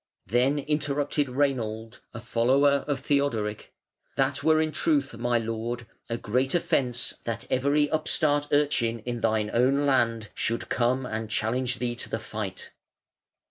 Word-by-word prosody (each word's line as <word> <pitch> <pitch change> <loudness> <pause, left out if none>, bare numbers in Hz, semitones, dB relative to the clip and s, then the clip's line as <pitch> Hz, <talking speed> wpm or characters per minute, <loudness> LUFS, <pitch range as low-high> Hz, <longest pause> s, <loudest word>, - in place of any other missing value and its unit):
Then 125 - +2
interrupted 145 0 0
Reinald, 120 -4 -1
a 115 - -7
follower 135 +4 +2
of 140 -3 -1
Theodoric: 130 -8 -1 0.4
"That 135 +1 0
were 160 0 +4
in 155 0 +1
truth, 145 -4 +1
my 120 +1 +1
lord, 115 +1 -3 0.2
a 115 - -1
great 130 +7 0
offence 125 -7 +1
that 115 +1 -3
every 140 +3 +2
upstart 145 -1 +1
urchin 130 -6 +2
in 120 -1 -3
thine 110 -1 +1
own 135 +4 +3
land 115 -5 +2
should 115 +1 -1
come 125 +2 +1
and 110 -2 -4
challenge 125 +3 0
thee 120 -1 -2
to - - -5
the - - -1
fight". 105 -4 -6
125 Hz, 140 wpm, -27 LUFS, 115-140 Hz, 0.4 s, were